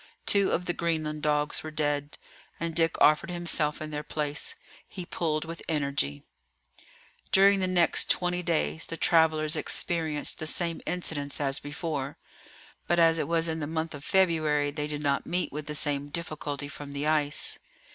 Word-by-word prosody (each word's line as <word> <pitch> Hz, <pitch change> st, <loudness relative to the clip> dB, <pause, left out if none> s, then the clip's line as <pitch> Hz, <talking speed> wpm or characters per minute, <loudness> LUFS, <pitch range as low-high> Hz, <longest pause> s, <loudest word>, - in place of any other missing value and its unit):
Two 200 Hz, -1 st, +4 dB
of 180 Hz, -, 0 dB
the 175 Hz, -, 0 dB
Greenland 155 Hz, -3 st, -1 dB
dogs 150 Hz, 0 st, +1 dB
were 155 Hz, -, -6 dB
dead, 145 Hz, -1 st, -2 dB, 0.4 s
and 165 Hz, 0 st, -2 dB
Dick 165 Hz, 0 st, +1 dB
offered 155 Hz, +5 st, +4 dB
himself 170 Hz, -4 st, +1 dB
in 155 Hz, -, -7 dB
their 150 Hz, 0 st, -3 dB
place. 150 Hz, -1 st, -3 dB, 0.3 s
He 180 Hz, -3 st, -7 dB
pulled 155 Hz, -2 st, -1 dB
with 165 Hz, 0 st, -7 dB
energy. 140 Hz, -, -1 dB, 1.1 s
During 195 Hz, +1 st, +6 dB
the 185 Hz, -, +1 dB
next 180 Hz, -2 st, +3 dB
twenty 180 Hz, 0 st, +2 dB
days 165 Hz, -1 st, 0 dB
the 165 Hz, -, -6 dB
travellers 160 Hz, -2 st, +3 dB
experienced 155 Hz, -1 st, -1 dB
the 155 Hz, -, -4 dB
same 170 Hz, +1 st, 0 dB
incidents 160 Hz, -5 st, -1 dB
as 135 Hz, -1 st, +1 dB
before. 145 Hz, -1 st, -4 dB, 0.7 s
But 175 Hz, -, +2 dB
as 165 Hz, -1 st, +5 dB
it -, -, -1 dB
was 165 Hz, 0 st, +2 dB
in 160 Hz, 0 st, -2 dB
the 145 Hz, -, -3 dB
month 160 Hz, +1 st, -3 dB
of 145 Hz, -1 st, -9 dB
February 155 Hz, -6 st, +2 dB
they 150 Hz, 0 st, -3 dB
did 150 Hz, 0 st, -5 dB
not 140 Hz, -1 st, 0 dB
meet 180 Hz, +1 st, -1 dB
with 150 Hz, 0 st, -5 dB
the 150 Hz, -, -3 dB
same 145 Hz, -1 st, +1 dB
difficulty 150 Hz, -3 st, -4 dB
from 145 Hz, 0 st, -9 dB
the 140 Hz, +1 st, -3 dB
ice. 150 Hz, -2 st, +1 dB
155 Hz, 170 wpm, -28 LUFS, 145-170 Hz, 1.1 s, During